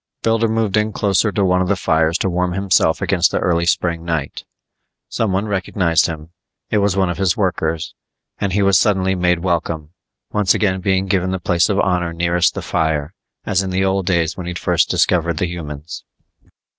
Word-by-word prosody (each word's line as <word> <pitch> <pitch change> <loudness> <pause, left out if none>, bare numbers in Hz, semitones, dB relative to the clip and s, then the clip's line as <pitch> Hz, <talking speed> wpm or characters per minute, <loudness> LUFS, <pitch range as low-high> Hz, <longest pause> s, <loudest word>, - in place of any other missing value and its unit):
Builder 115 0 +2
moved 110 -2 0
in 105 0 +1
closer 100 +1 +1
to 100 +1 0
one 90 0 +2
of 90 - 0
the 100 - +2
fires 80 -2 +1
to - - -1
warm 90 0 -1
himself 95 -4 +1
against 90 -3 +2
the - - -2
early 85 -1 0
spring 85 -1 0
night. 80 -5 -4 0.6
Someone 100 -2 -1
recognized 95 -4 +1
him 80 0 -7 0.4
it 105 - +2
was 100 -1 +1
one 95 -2 +2
of 85 - -6
his 95 -3 +1
workers 80 -5 -1 0.5
and 100 - -1
he 100 +2 +1
was 95 -3 +4
suddenly 95 -2 +1
made 90 -2 0
welcome, 85 -3 -2 0.4
once 105 -3 +2
again 95 -3 0
being 95 0 +1
given 95 -1 0
the 95 0 -2
place 85 +2 +1
of 100 -1 +1
honor 90 -3 0
nearest 85 0 +1
the - - -5
fire, 80 0 -1 0.3
as 95 -3 +1
in 95 - -3
the 95 +1 0
old 95 -1 0
days 85 -3 +1
when 90 -2 -7
he'd 90 0 -4
first - - +1
discovered 85 -2 +1
the 90 - 0
humans. 80 -2 -7
90 Hz, 195 wpm, -19 LUFS, 85-95 Hz, 0.6 s, was